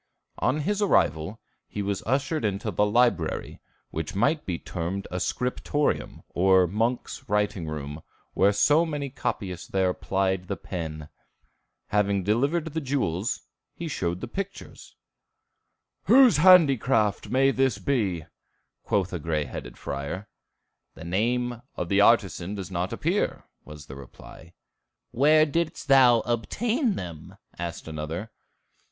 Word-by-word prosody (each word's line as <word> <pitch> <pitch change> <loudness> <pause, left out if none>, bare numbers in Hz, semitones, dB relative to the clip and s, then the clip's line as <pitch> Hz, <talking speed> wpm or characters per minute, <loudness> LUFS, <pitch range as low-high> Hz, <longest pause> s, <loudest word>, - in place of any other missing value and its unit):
On 150 +4 +1
his 205 +6 -1
arrival 85 - +1 0.3
he 105 - -4
was 100 -1 -2
ushered 140 +4 0
into 105 +1 -1
the 105 +3 +2
library, 105 -7 +1 0.3
which 80 +2 -4
might 140 +10 +1
be 90 -3 -1
termed 90 +4 -4
a 90 - -2
scriptorium, 125 +7 -1
or 95 0 +4
monks' 115 +8 -2
writing 105 -4 0
room, 75 0 -5 0.5
so 145 +10 +4
many 145 -4 -3
copyists 95 -9 -4
there 95 -1 +1
plied 95 -1 -1
the 100 - -3
pen. 80 -4 -6 0.8
Having 100 -1 +1
delivered 140 - +1
the 160 - -1
jewels, 120 - -1 0.3
he 170 - -5
showed 90 - -2
his - - -6
pictures. 195 0 -7 1.1
"Whose 250 - +7
handicraft 135 - +4
may 135 +2 +3
this 130 -2 +1
be?" 100 - -1 0.6
quoth 95 -3 -1
a 90 - -2
gray 75 -1 -1
headed 60 -3 -8
friar. 70 +9 -5 0.7
"The 80 - -10
name 120 +6 0
of 85 - -4
the 100 +1 +4
artisan 100 -4 +3
doth 95 -2 -6
not 90 0 -2
appear," - - -1 0.2
was 75 -1 -11
the 65 - -10
reply. 80 +4 -13 0.6
"Where 155 +4 +5
didst 165 0 -2
thou 125 -4 +6
obtain 220 - 0
them?" 85 -4 -8 0.2
asked 85 -2 -5
another. 80 +7 -5
105 Hz, 130 wpm, -26 LUFS, 85-135 Hz, 1.1 s, Whose